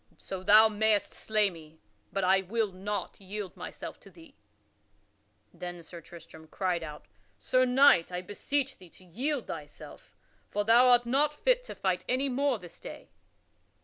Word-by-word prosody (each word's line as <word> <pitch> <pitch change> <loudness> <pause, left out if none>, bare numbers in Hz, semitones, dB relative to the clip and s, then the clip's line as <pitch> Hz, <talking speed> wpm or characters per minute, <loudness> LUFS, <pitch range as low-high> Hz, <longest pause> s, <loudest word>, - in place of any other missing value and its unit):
So 190 -1 -7
thou 215 +3 +7
mayst 215 -1 +1
slay 215 -2 +1
me, 160 -2 -14 0.3
but 195 - -2
I 190 +1 +4
will 210 +2 -1
not 195 +1 -5
yield 195 0 -6
myself - - -8
to - - -16
thee." 325 -4 -17 1.2
Then 175 -1 -8
Sir 170 +1 -11
Tristram 160 -1 -14
cried 180 0 -2
out: 150 -2 -9 0.3
"Sir 255 0 +2
Knight, 250 -9 +5
I 180 0 -4
beseech 270 +8 -3
thee 180 - -14
to 185 - -19
yield 255 - -3
thyself, 150 -2 -10 0.3
for 205 0 -2
thou 235 +3 +6
art 245 -1 +5
not 285 +5 +2
fit - - +2
to - - -8
fight 185 -2 -1
any 265 +2 +1
more 270 0 +1
this 175 -4 -13
day." - - -10
205 Hz, 160 wpm, -29 LUFS, 180-250 Hz, 1.2 s, thou